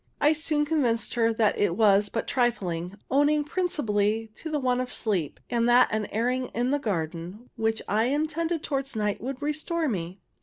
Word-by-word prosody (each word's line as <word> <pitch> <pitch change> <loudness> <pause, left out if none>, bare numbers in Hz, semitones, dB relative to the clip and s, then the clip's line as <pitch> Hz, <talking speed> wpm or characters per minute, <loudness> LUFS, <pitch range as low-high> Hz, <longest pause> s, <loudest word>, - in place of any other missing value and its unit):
I 300 +2 +4
soon 305 -1 0
convinced 265 -7 0
her 230 -1 +2
that 220 -1 +1
it 190 -3 +1
was 205 -2 +4
but 230 - -3
trifling, 195 -8 -1 0.2
owing 295 +2 +3
principally 225 - 0
to 320 - -7
the 305 - 0
want 255 -1 +1
of 255 - -5
sleep, 185 -10 -1
and 235 -1 +1
that 245 +1 +6
an 215 -1 -1
airing 250 +4 0
in 245 +3 +1
the 290 - +1
garden, 180 - -4
which 225 -1 -1
I 215 +2 +2
intended 315 +4 -1
towards 275 -2 -3
night, 210 -1 -1
would 260 +2 -4
restore 310 +2 -1
me. 185 -5 -3
240 Hz, 180 wpm, -26 LUFS, 210-290 Hz, 0.2 s, that